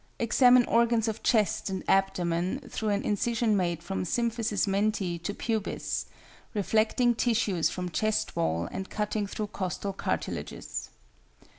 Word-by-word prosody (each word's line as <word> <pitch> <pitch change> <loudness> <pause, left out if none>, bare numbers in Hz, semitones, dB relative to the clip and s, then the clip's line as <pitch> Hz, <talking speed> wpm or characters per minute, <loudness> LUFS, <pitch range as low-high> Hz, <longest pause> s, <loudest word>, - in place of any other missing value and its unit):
Examine 245 +1 +5
organs 235 -1 +3
of 220 0 -3
chest 215 -3 +2
and 190 -1 -3
abdomen 185 - +1
through 220 -2 -2
an 200 0 0
incision 220 +1 +1
made 175 -3 0
from 195 +2 -3
symphysis 225 +1 0
menti 195 -3 0
to 180 +4 -3
pubis, 220 0 -2 0.5
reflecting 220 +4 +2
tissues 220 -7 +1
from 180 -1 -4
chest 215 +6 0
wall 80 +1 0
and 190 - -5
cutting 210 -1 -2
through 210 +2 -3
costal 195 +1 -3
cartilages. - - -4
210 Hz, 130 wpm, -28 LUFS, 185-230 Hz, 0.5 s, Examine